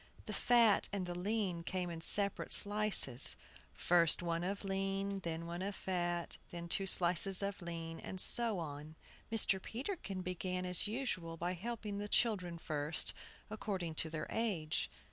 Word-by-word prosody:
The - - -5
fat 235 -4 +4
and 200 -3 -2
the 175 - -4
lean 185 -1 -2
came 180 +1 -3
in 165 -1 -7
separate 200 +4 +2
slices, 205 - +5 0.4
first 170 -1 +4
one 170 0 -1
of 195 +3 -3
lean, 195 0 -2
than 165 -2 -4
one 170 +1 -5
of 200 +1 -3
fat, 175 -2 -2
then 170 0 -7
two 195 +3 0
slices 185 +2 +4
of 200 -1 -3
lean, 165 -1 -6
and 190 - -7
so 230 +1 +3
on. 155 -1 -7 0.4
Mr. 205 -4 +3
Peterkin 225 - -5
began 180 0 -3
as 180 +2 -1
usual 195 -8 -3
by 175 +2 -2
helping 210 +1 -5
the 205 - -4
children 185 -8 +2
first, 150 -1 0 0.4
according 190 -6 -3
to 160 +1 0
their 155 -1 -4
age. 190 - -1
185 Hz, 155 wpm, -35 LUFS, 170-205 Hz, 0.4 s, slices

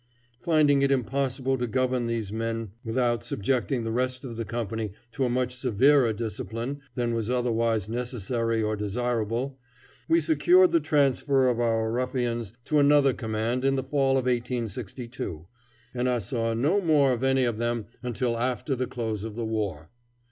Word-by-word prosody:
Finding 145 -1 +4
it 140 - +3
impossible 135 0 0
to 125 - -1
govern 125 +1 0
these 115 -3 -3
men 115 -2 -3
without 120 -1 0
subjecting 125 +3 -1
the 115 - -2
rest 130 +2 -1
of 120 -4 -6
the 115 - -3
company 110 -3 -3 0.2
to 135 +2 -1
a - - 0
much 125 0 -1
severer 125 +1 +4
discipline 115 +4 -4
than 120 -2 0
was 115 -1 -2
otherwise 115 -4 +1
necessary 115 -1 -1
or 110 0 0
desirable, 120 +4 -2 0.5
we 330 +1 +4
secured 355 +3 +4
the 335 - +4
transfer 140 - +2
of 120 -2 +1
our 115 -1 +1
ruffians 120 -3 -1
to 150 - +2
another 140 -2 +5
command 115 +2 -2
in 135 0 +3
the 130 - -1
fall 135 0 +1
of 130 - -1
1862, 120 - -3 0.5
and 125 0 0
I 125 - +2
saw 115 +1 -2
no 155 - +2
more 150 -6 +4
of 125 +1 -3
any 135 0 +3
of 120 -3 -1
them 120 -2 -1 0.2
until 120 -1 -1
after 130 +3 -1
the 130 0 -2
close 110 -5 -3
of 110 -1 -6
the 115 -1 -3
war. 100 -8 -3
120 Hz, 165 wpm, -27 LUFS, 115-130 Hz, 0.5 s, another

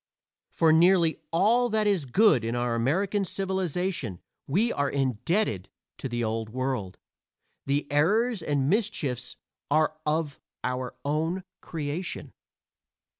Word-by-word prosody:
For 160 -1 +3
nearly 170 0 +4
all 225 +8 +3
that 215 -1 +1
is 195 -8 +2
good 135 - +4
in 115 +1 -2
our 120 0 0
American 185 - +1
civilization 180 - -2 0.3
we 210 - +2
are 140 -1 0
indebted 130 - 0 0.3
to 135 - -4
the 120 0 -2
Old 110 0 -2
World; 125 -6 -3 0.7
the 140 +2 +1
errors 210 +9 +2
and 145 -4 0
mischiefs 155 - -1 0.3
are 155 +1 +2
of 150 -2 -1 0.2
our 125 0 -3
own 160 +6 -1 0.2
creation. 160 +3 -5
155 Hz, 120 wpm, -27 LUFS, 130-190 Hz, 0.7 s, nearly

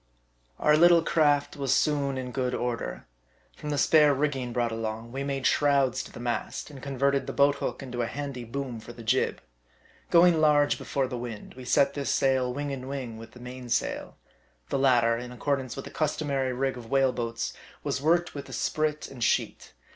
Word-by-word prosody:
OUR 150 - +4
little 170 0 +6
craft 145 -3 +2
was 140 -3 -1
soon 140 -1 +2
in 125 -1 -4
good 125 -1 -1
order. 115 - -3 0.5
From 150 - -7
the 145 - -1
spare 150 0 +5
rigging 135 -3 -1
brought 120 -1 0
along, 115 +1 -4
we 135 +2 -3
made 135 -2 -3
shrouds 140 -3 +3
to - - -10
the - - -10
mast, 120 +4 -3
and 135 -3 -11
converted 140 0 0
the - - -3
boat 140 0 +4
hook 140 - -4
into 125 -2 -4
a 115 - 0
handy 140 -2 -5
boom 125 0 -5
for 120 +2 -10
the 115 - -11
jib. 130 +4 +1 0.7
Going 170 -1 +5
large 145 -1 +4
before 135 -1 -1
the 125 -1 -5
wind, 115 -3 -7
we 130 0 -10
set 140 +2 +3
this 140 -2 -3
sail 130 -2 +2
wing 145 +2 -3
and 130 0 -6
wing 125 -5 -5
with 115 - -11
the 125 - -13
main 125 0 -8
sail. - - -2 0.5
The - - 0
latter, 120 -4 +4
in 125 0 -7
accordance 130 0 -2
with 135 - -6
the - - -9
customary 140 -4 -1
rig 130 +1 -1
of 115 -2 -10
whale 135 -2 +3
boats, 115 -1 -3 0.3
was 135 - -2
worked 170 +3 +2
with 140 - -7
a - - -8
sprit 155 -1 -1
and 125 -3 -6
sheet. - - 0
135 Hz, 200 wpm, -27 LUFS, 125-145 Hz, 0.7 s, little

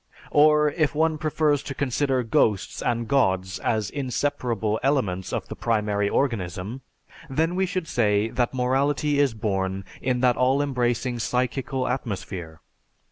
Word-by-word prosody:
Or, 150 0 +5
if 150 -2 0
one 160 0 +1
prefers 150 -2 +1
to 140 - -6
consider 135 -1 0
ghosts 110 -3 +1
and 120 -1 -1
gods 95 -8 +1
as 110 -3 -1
inseparable 125 -5 -1
elements 115 -10 0
of - - -3
the - - -7
primary 105 -3 0
organism, 105 -2 -2 0.5
then 160 +5 0
we 190 +1 +1
should 185 -3 -3
say 105 -2 +1
that 120 0 0
morality 135 +3 +1
is 140 -5 +2
born 95 -3 -2 0.2
in 125 -1 0
that 125 -2 +3
all 130 +2 +3
embracing 125 -2 -1
psychical 130 +2 -1
atmosphere. 95 -10 -4
125 Hz, 135 wpm, -25 LUFS, 105-140 Hz, 0.5 s, Or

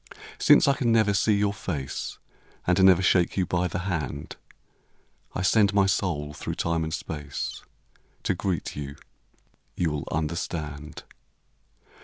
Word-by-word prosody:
Since - - +6
I 140 - +5
can 125 -4 0
never 110 -3 +4
see 105 +1 +3
your 100 0 +1
face, 75 -10 -4 0.5
And 90 +2 +3
never 95 -1 +6
shake 90 0 +3
you 95 - +2
by 90 +1 0
the 90 +2 -4
hand, 75 -6 -3 1.0
1 90 - -2
send 100 +1 +4
my 100 -1 +5
soul 85 -7 -1
through - - -5
time 85 -1 0
and 80 - -3
space 75 -3 -5 0.6
To - - +1
greet 95 -1 -2
you. 70 -1 -6 0.8
You 85 -3 0
will 75 -1 -4
understand. 75 -1 -4
90 Hz, 140 wpm, -26 LUFS, 75-95 Hz, 1.0 s, Since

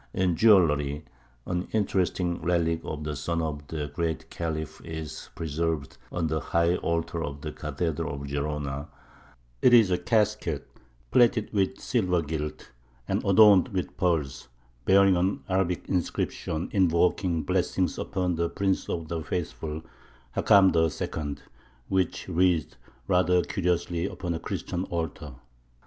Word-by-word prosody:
In 90 -2 +2
jewellery 75 -8 +4 0.4
an 90 0 -2
interesting 90 -4 0
relic 85 -1 +1
of 75 -1 -5
the 75 0 -3
son 85 +5 -2
of 75 -3 -3
the 75 -3 -4
Great 80 -2 -3
Khalif 80 -2 -4
is 80 -2 -7
preserved 80 -2 -2
on 85 -2 -1
the 80 0 0
high 85 +2 +1
altar 85 0 -2
of 70 -1 -6
the 75 - -4
cathedral 80 -2 -3
of 70 0 -6
Gerona; 70 0 -3 0.7
it 120 - +7
is 110 -5 +6
a 90 - +2
casket, 105 - 0 0.4
plated 115 -3 +3
with 95 -2 0
silver 90 -8 +1
gilt, 75 0 -5 0.4
and - - 0
adorned 100 -1 +6
with 95 -3 -4
pearls, 80 -9 0 0.4
bearing 100 0 +6
an 90 +3 0
Arabic 95 -2 0
inscription 85 -2 -2
invoking 90 -2 +2
blessings 90 -1 0
upon 90 -1 -1
the 85 0 0
Prince 95 -1 -1
of 85 -2 -3
the 80 0 -3
Faithful, 75 -1 -4 0.5
Hakam 95 -3 +5
II., 80 -2 -1 0.5
which 95 -2 0
reads 85 -3 +1 0.3
rather 90 -1 +3
curiously 90 -1 -1
upon 90 -3 -4
a 80 - -3
Christian 90 +2 -3
altar. 80 -4 -4
85 Hz, 130 wpm, -27 LUFS, 80-90 Hz, 0.7 s, it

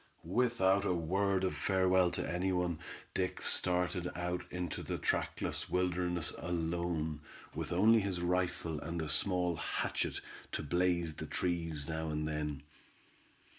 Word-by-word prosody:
Without 100 -1 +3
a 90 - +2
word 95 +3 +1
of 95 - +1
farewell 95 -1 +3
to - - -2
any 90 +3 0
one, 90 -3 0 0.3
Dick 90 -1 -1
started 90 -1 +1
out 90 0 -1
into 90 -2 -3
the - - -3
trackless - - -1
wilderness 90 -2 0
alone, 85 -2 -1 0.3
with - - -4
only 110 +6 +6
his 95 -3 -1
rifle 85 -3 0
and 85 +3 -4
a 80 - -2
small 90 -1 +1
hatchet - - -1 0.3
to - - -1
blaze 85 +1 +1
the - - -6
trees 80 -5 -1
now 80 0 -2
and 75 0 -1
then. 75 -2 -2
90 Hz, 135 wpm, -34 LUFS, 80-90 Hz, 0.3 s, only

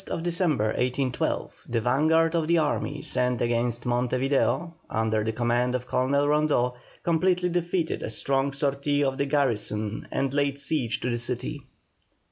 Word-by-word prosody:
On - - -10
the - - -4
31st 165 - -3
December, 170 - +1
1812, 125 +3 -1
the 115 - +1
vanguard 155 +7 +3
of 165 -2 0
the 170 +1 +3
army 150 -1 -1
sent 125 -1 0
against 120 0 0
Monte 125 +1 0
Video, 140 +6 +1 0.2
under 110 -1 0
the 110 - -1
command 120 +2 0
of 125 0 -3
Colonel 130 +3 +1
Rondeau, 150 -4 +2 0.3
completely 180 +2 +2
defeated 175 -1 -1
a - - -4
strong 135 +5 0
sortie 140 +1 0
of 135 -1 -1
the 140 - +1
garrison 110 -6 0
and 135 -1 -1
laid 140 -1 0
siege 140 -5 -1
to 125 - -1
the 120 - 0
city. 125 +4 -2
135 Hz, 165 wpm, -26 LUFS, 120-150 Hz, 0.3 s, vanguard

